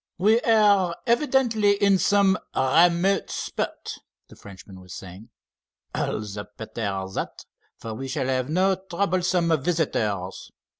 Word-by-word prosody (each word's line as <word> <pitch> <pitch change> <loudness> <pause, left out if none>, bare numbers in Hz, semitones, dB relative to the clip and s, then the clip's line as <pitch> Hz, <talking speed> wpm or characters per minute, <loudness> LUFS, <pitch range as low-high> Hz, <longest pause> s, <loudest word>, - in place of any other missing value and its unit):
"We 215 +5 +4
are 205 -6 +3
evidently 235 -5 +2
in 200 -1 +3
some 200 -1 +3 0.2
remote 170 +7 +3
spot," - - -5 0.3
the - - -14
Frenchman 95 -1 -13
was 90 -1 -11
saying. 95 +4 -11 0.6
"All - - -2
the 105 -1 -7
better 105 -3 -4
that, - - -5 0.3
for 115 - -7
we 135 +5 -6
shall 130 - -2
have 130 0 -1
no 185 +4 +2 0.2
troublesome 175 -3 +1
visitors. 110 - -2
170 Hz, 120 wpm, -24 LUFS, -, 0.6 s, We